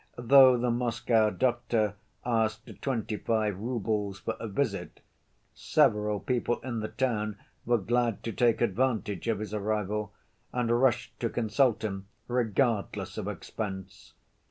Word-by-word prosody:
Though 130 +1 +7
the 120 0 +1
Moscow 115 -2 +2
doctor 120 -3 0 0.3
asked 110 -2 0 0.2
twenty‐five 110 -4 -1
roubles 105 -4 -2
for 115 +3 -3
a 115 - -4
visit, 100 - -2 0.5
several 105 0 +2
people 120 0 -1
in 120 -2 -3
the 110 - -3
town 110 -5 -1 0.3
were 120 0 +4
glad 115 +1 0
to 115 - -3
take 120 0 +2
advantage 115 -1 0
of 115 -2 +1
his 105 +1 -6
arrival, 105 -1 -1 0.4
and 120 -2 0
rushed 130 -4 +1
to - - 0
consult 115 0 +1
him 95 -2 -4 0.2
regardless 120 -2 0
of - - -4
expense. 95 -2 -6
110 Hz, 130 wpm, -29 LUFS, 105-120 Hz, 0.5 s, Though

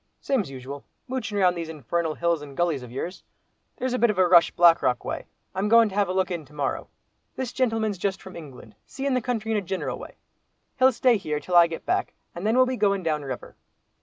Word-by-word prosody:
"Same's 250 - -1
usual, 135 +1 -8 0.2
moochin' 250 -5 -3
round 180 -2 +3
these 165 -2 -5
infernal 160 +2 -2
hills 170 -2 0
and 140 -2 -11
gullies 165 -7 0
ov 125 - -10
yours. 170 +8 -5 0.6
There's 255 -1 -2
a 250 - 0
bit 235 - +4
of 210 - -1
a 185 -1 +4
rush 170 -1 +6
Black 170 -1 +5
Rock 125 -1 0
way. - - -4 0.3
I'm 195 +3 -1
goin' 230 -1 +6
to - - -10
have 200 -2 +1
a - - 0
look 185 0 0
in 170 -3 -3
to 145 - -20
morrow. 145 -2 -2 0.5
This 255 -2 -4
gentleman's 225 -6 0
just 195 +1 -1
from 190 - -11
England, 135 -9 -11
seein' 275 0 -2
the 255 - +1
country 225 -2 -2
in 220 - +2
a - - 0
gineral 190 0 -4
way; - - -10 0.6
he'll 260 +1 +6
stay 245 -1 +3
here 150 -6 -3
till 180 +3 -3
I 170 -1 +8
get 165 -1 -7
back, - - 0 0.2
and 175 +5 -4
then 225 - +2
we'll 255 0 +6
be 255 0 -2
going 200 -3 +1
down 155 -2 0
river." 130 -3 -7
185 Hz, 235 wpm, -25 LUFS, 160-225 Hz, 0.6 s, I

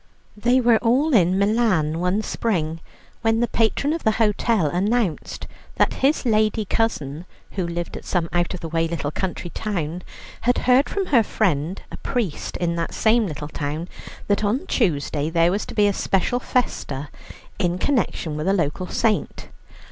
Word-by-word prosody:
They 240 +5 +3
were 235 -3 +4
all 265 +6 +2
in 185 -4 +4
Milan 200 -7 +2
one 180 +4 0
spring, 165 -10 -1 0.4
when 225 0 +2
the 240 - +2
patron 235 +7 +1
of 330 - -4
the 220 - +3
hotel 215 -3 +2
announced 190 +3 -1 0.3
that - - +2
his 275 +1 +2
lady 215 -1 +2
cousin, 170 -9 -1 0.3
who 185 -3 -2
lived 170 0 -4
at - - -7
some 175 -3 -1
out 175 +1 0
of 180 - -8
the 165 - -4
way 165 0 0
little 160 -3 -3
country 175 0 -4
town, 175 -5 -3 0.4
had 245 +1 +2
heard 255 +3 +4
from 395 -1 -1
her 265 -9 +4
friend, 185 -5 -1
a - - -7
priest 230 - -3
in 170 -1 -1
that 165 - -3
same 225 0 +3
little 150 -2 -5
town, 150 +3 -4 0.4
that 205 +1 +1
on 215 +7 0
Tuesday 150 - 0
there 165 +1 +3
was 200 +3 -2
to - - -8
be 210 - +4
a 205 - +3
special 195 +6 0
festa 145 - -2 0.5
in 175 -3 +1
connection 185 - 0
with 155 +3 -3
a 195 - +4
local 175 0 -1
saint. 220 +2 -1
195 Hz, 170 wpm, -23 LUFS, 165-230 Hz, 0.5 s, were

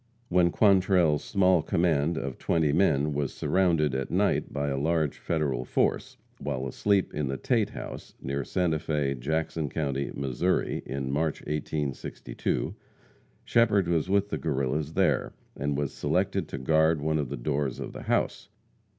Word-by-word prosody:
When 90 0 +4
Quantrell's 90 -6 +3
small 95 -4 +3
command 85 -3 +1
of 70 -4 -4
twenty 80 -3 +1
men 75 -5 +2
was 70 -1 -1
surrounded 85 -7 +2
at 65 0 -2
night - - +1
by 70 0 -1
a 70 - -1
large 80 0 0
Federal 75 -7 -1
force, - - 0 0.2
while 65 +1 -3
asleep 100 +9 +1
in 75 -2 -1
the 70 0 -2
Tate - - +1
house, - - -8
near 70 +1 -3
Santa 80 +2 0
Fe, 75 -3 -1
Jackson 80 +3 -2
county, 70 -2 -2
Missouri, 70 +7 0
in 70 -1 -3
March 75 +2 -1
1862, 75 -2 -3 0.7
Shepherd 105 -6 +3
was 85 0 +1
with 100 +1 +2
the - - -2
Guerrillas 75 +1 -1
there, - - +1 0.2
and 70 0 -2
was 70 -1 -2
selected - - 0
to - - -5
guard 80 +4 +3
one 80 +1 0
of 70 -4 -2
the 70 - -4
doors 70 +1 -1
of - - -6
the - - -7
house. - - -1
75 Hz, 155 wpm, -28 LUFS, 70-85 Hz, 0.7 s, When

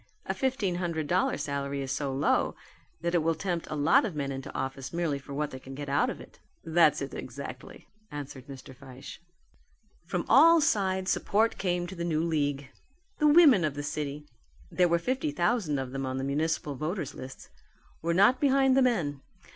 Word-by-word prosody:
A 190 - -1
fifteen 205 -6 -1
hundred 170 -3 -2
dollar 180 +5 +1
salary 140 -1 -3
is 130 - -4
so 135 0 -2
low 135 +2 +1 0.5
that 170 +1 -1
it 175 - +4
will 165 +1 +1
tempt 175 0 -3
a - - -3
lot 165 - +4
of 205 -9 -3
men 140 -2 -2
into 135 0 -6
office 135 +1 -4
merely 165 -5 -1
for 140 - -13
what 150 0 -2
they 130 - -7
can 135 +1 -10
get 145 0 -6
out 140 +1 +2
of - - -6
it." - - -14 0.2
"That's 160 -3 +3
it 135 - -7
exactly," 130 +1 -8 0.2
answered 140 -2 -8
Mr. 135 -1 -10
Fyshe. 130 0 -11 0.9
From 180 0 -2
all 325 +7 +7
sides 190 -8 +1
support 220 +3 +1
came 175 -2 0
to 175 - -8
the 170 -2 -5
new 160 -2 0
league. 145 -4 -1 0.5
The 300 - +4
women 295 - +7
of 150 -2 -1
the 145 - -4
city 145 0 -4 0.5
there 180 -1 +3
were 170 - +3
fifty 255 - -1
thousand 175 - 0
of 130 -1 -4
them 135 0 -3
on 130 0 -3
the 135 - -3
municipal 150 +1 -1
voters 155 0 -4
list 130 +1 -10 0.5
were 170 +1 0
not 205 +7 +5
behind 270 -2 +4
the 270 - +5
men. 170 - 0
155 Hz, 195 wpm, -28 LUFS, 140-185 Hz, 0.9 s, all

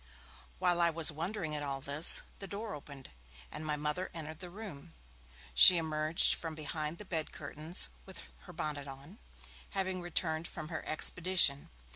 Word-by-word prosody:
While 175 -1 +1
I 170 - +4
was 165 -1 +3
wondering 165 +1 -4
at 150 - -1
all 140 -2 -3
this, 140 +4 +3 0.2
the 195 - -6
door 210 +2 -6
opened, 140 -2 -10 0.4
and 155 - -5
my 150 -1 -1
Mother 150 +5 -3
entered 155 -1 -7
the 180 - -8
room; 175 -5 -10 0.6
she 175 - +9
emerged 155 0 +3
from 165 -2 -5
behind 155 +1 -4
the 210 - -9
bed 160 -4 -3
curtains, 155 +4 +1 0.2
with 190 - -10 0.3
her 180 - -11
bonnet 150 -3 -4
on, 140 - -11 0.6
having 190 -1 -2
returned 165 -1 -2
from 155 -2 -8
her 160 - -5
expedition. 165 -2 +3
160 Hz, 160 wpm, -32 LUFS, 150-180 Hz, 0.6 s, she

